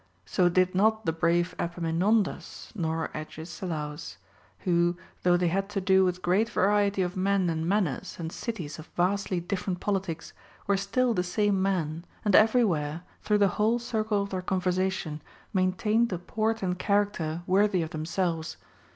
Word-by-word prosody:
So 175 - +2
did 185 +1 +2
not 220 +3 +2
the 160 - +1
brave 170 +2 +1
Epaminondas 175 +5 -1
nor 165 -5 -2
Agesi 160 +3 -6
laus, 150 -1 -5 0.4
who, 175 -1 +2 0.2
though 175 0 +4
they 175 -1 +1
had 195 +3 -1
to 205 - -2
do 190 0 +4
with 180 0 -1
great 200 +6 +2
variety 200 -1 +2
of 180 +2 -3
men 190 -2 +1
and 160 +1 -2
manners, 190 -9 0
and 165 -1 -5
cities 175 -11 -5
of 155 - -10
vastly 185 +1 +1
different 180 +1 -3
politics, 190 -5 -3 0.3
were 200 - +2
still 235 +6 +1
the 180 - +1
same 195 +2 +1
men, 170 -4 -1 0.2
and 205 - +4
everywhere, 180 -9 +3 0.2
through 210 -1 +2
the 200 -1 +4
whole 225 +3 +3
circle 220 -3 -1
of 200 - -7
their 185 -1 -2
conversation, 185 -4 -1 0.3
maintained 210 +5 +2
a 180 - -1
port 220 +5 -2
and 180 -1 -1
charac 205 0 +2
ter 160 +1 -4
worthy 190 -1 +3
of 160 - -6
themselves. 165 +1 -2
185 Hz, 160 wpm, -28 LUFS, 170-200 Hz, 0.4 s, though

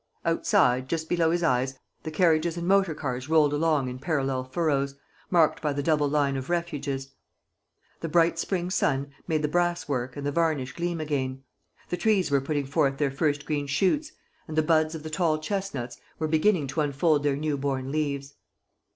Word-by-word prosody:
Outside, 125 +1 +2
just 160 -1 -2
below 170 -2 +2
his 170 +1 0
eyes, 130 -2 +1 0.2
the - - -5
carriages 165 0 +2
and 170 0 -3
motor 190 -4 +3
cars 130 -2 -4
rolled 155 -2 +4
along 150 -3 +1
in 125 0 -6
parallel 135 -4 -1
furrows, 140 0 0 0.3
marked 165 -4 +3
by 150 -2 0
the 145 0 -2
double 150 -2 +2
line 140 -2 +1
of 135 +2 -5
refuges. 145 -6 -2 0.9
A 165 - -2
bright 165 +1 +3
spring 180 0 -1
sun 140 -5 0 0.2
made 155 -1 0
the - - +2
brass 175 +2 0
work 130 -1 -2
and 140 - -5
the 145 - 0
varnish 155 -5 0
gleam 175 -1 -2
again. 135 -3 -2 0.5
The 180 - -1
trees 195 -4 +2
were 140 -1 +3
putting 145 0 -1
forth 140 0 +1
their 145 -2 +1
first 145 +1 0
green 145 -2 -2
shoots; 245 - +1 0.4
and 155 - -6
the 155 - +4
buds 155 0 +2
of 155 - -7
the 155 - -6
tall 160 -2 +1
chestnuts 155 -8 -4 0.2
were 160 - -1
beginning 160 +1 +2
to 155 - -1
unfold 145 +1 +2
their 145 -1 +1
new 150 +1 -1
born 135 -1 -2
leaves. 140 -2 -2
150 Hz, 185 wpm, -27 LUFS, 140-165 Hz, 0.9 s, rolled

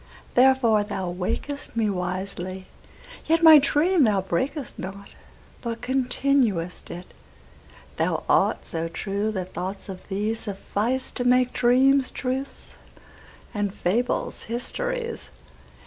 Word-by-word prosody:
Therefore 245 -4 +4
thou 190 -3 -3
waked'st 225 +11 -4
me 225 -2 +2
wisely; 185 0 -4 0.6
yetMy 320 -2 +8
dream 310 +4 +3
thou 205 -5 +3
brak'st 250 - -3
not, 195 +2 -7 0.5
but 230 -1 -4
continued'st 250 -8 0
it:Thou 175 +1 -7
art - - +2
so 165 0 -3
true 200 +5 -2
that 185 -3 -5
thoughts 185 +4 -5
of 185 -1 -8
thee 210 +2 -1
sufficeTo 225 +4 -2
make 250 0 +3
dreams 260 +2 +4
truths 265 +1 -4 0.8
and 205 -2 -1
fables 225 +6 -1
histories. 475 - -3
225 Hz, 100 wpm, -25 LUFS, 190-265 Hz, 0.8 s, yetMy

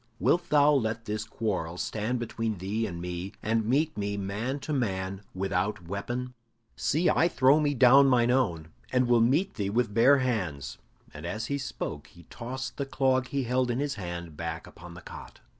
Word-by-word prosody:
Wilt 175 0 +2
thou 150 0 +5
let 115 -4 0
this 105 0 -2
quarrel 95 -7 -3
stand 110 +6 -2
between 115 -2 -3
thee 105 +5 -2
and 85 -3 -6
me, 90 +2 -5
and 110 0 +1
meet 150 +6 +1
me 100 0 -2
man 105 +8 -3
to 155 - -3
man 95 -7 -2
without 95 -1 -1
weapon? 120 +7 -4 0.4
See, 165 +5 +1
I 170 - +4
throw 135 -2 +4
me 145 -2 +1
down 135 +2 +7
mine 120 -2 +4
own, 85 -12 0 0.2
and 125 -1 +2
will 120 -1 +4
meet 150 +12 +2
thee 100 -2 -2
with 115 0 0
bare 125 +6 +6
hands." 90 - -2 0.3
And - - -9
as 110 +1 -3
he 140 - -1
spoke, 75 - -5
he 85 - -17
tossed 130 +2 -6
the 140 - -2
clog 130 -2 +1
he 140 0 -1
held 125 +1 +1
in 120 - 0
his 140 +1 -1
hand 85 - -6
back 80 +1 -5
upon 85 +1 -12
the 85 - -10
cot. - - -11
115 Hz, 190 wpm, -28 LUFS, 95-130 Hz, 0.4 s, down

